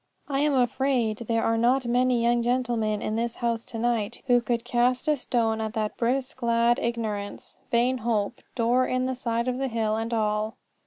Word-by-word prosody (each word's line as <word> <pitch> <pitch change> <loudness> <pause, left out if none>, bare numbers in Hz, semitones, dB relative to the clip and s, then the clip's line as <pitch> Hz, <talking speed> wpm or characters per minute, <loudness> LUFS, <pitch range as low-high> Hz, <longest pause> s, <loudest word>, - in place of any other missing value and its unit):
I 275 -1 -1
am 295 -1 +2
afraid 250 -3 +1
there 230 -1 +1
are 225 0 +1
not 250 +3 +3
many 245 0 +2
young 240 0 +3
gentlemen 235 -3 0
in 215 - -1
this 235 +1 -1
house 235 -1 -1
to 230 - -6
night 230 -2 -1
who 245 -2 +4
could 235 -1 -2
cast 250 +2 +1
a 305 - +4
stone 230 -4 0
at 220 0 -3
that 215 -1 -1
brisk 255 +2 -1
lad 235 0 +3
Ignorance, 215 -4 -4
Vain 250 +1 +2
Hope, 225 -1 -1
door 245 +2 +2
in 255 0 0
the 260 - -1
side 235 -1 -2
of 255 0 -1
the 270 - 0
hill, 225 -3 0
and 225 +1 -3
all. 215 0 0
235 Hz, 195 wpm, -26 LUFS, 225-250 Hz, -, who